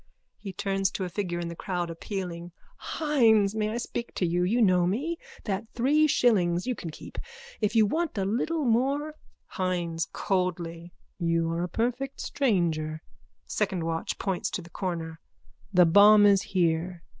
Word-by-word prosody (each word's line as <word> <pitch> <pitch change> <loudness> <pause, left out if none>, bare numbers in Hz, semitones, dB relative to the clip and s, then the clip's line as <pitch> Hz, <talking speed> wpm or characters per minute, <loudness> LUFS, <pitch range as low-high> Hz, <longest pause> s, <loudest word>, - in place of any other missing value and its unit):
(He 195 - -6
turns 195 0 0
to 190 - -3
a 180 - -3
figure 175 -2 -3
in 170 - -3
the 170 - -6
crowd, 175 -2 -3
appealing.) 175 -1 -6 0.4
Hynes, 225 -10 +3
may 215 -1 -1
I 225 - -3
speak 235 0 -5
to 185 - 0
you? 175 +1 0
You 215 +7 +1
know 180 -5 +4
me. 290 - -2 0.2
That 205 +1 -3
three 295 +6 +3
shillings 185 - +2
you 255 - 0
can 180 -7 -7
keep. 155 - -9 0.4
If 210 +1 0
you 220 -1 +6
want 320 +5 -1
a 195 - 0
little 280 +9 -1
more... 275 +6 +1 0.4
HYNES: 175 -3 -2
(Coldly.) 175 -3 -2 0.3
You 165 -1 +1
are 165 +1 -2
a 175 - -2
perfect 250 +6 -2
stranger. 165 - 0 0.4
SECOND 190 -5 -1
WATCH: 165 0 -2
(Points 195 +1 -2
to 185 - -4
the 170 - -15
corner.) 165 -4 -4 0.5
The 180 -2 +6
bomb 205 +4 +7
is 200 -2 +5
here. 175 -1 -1
190 Hz, 165 wpm, -27 LUFS, 170-225 Hz, 0.5 s, bomb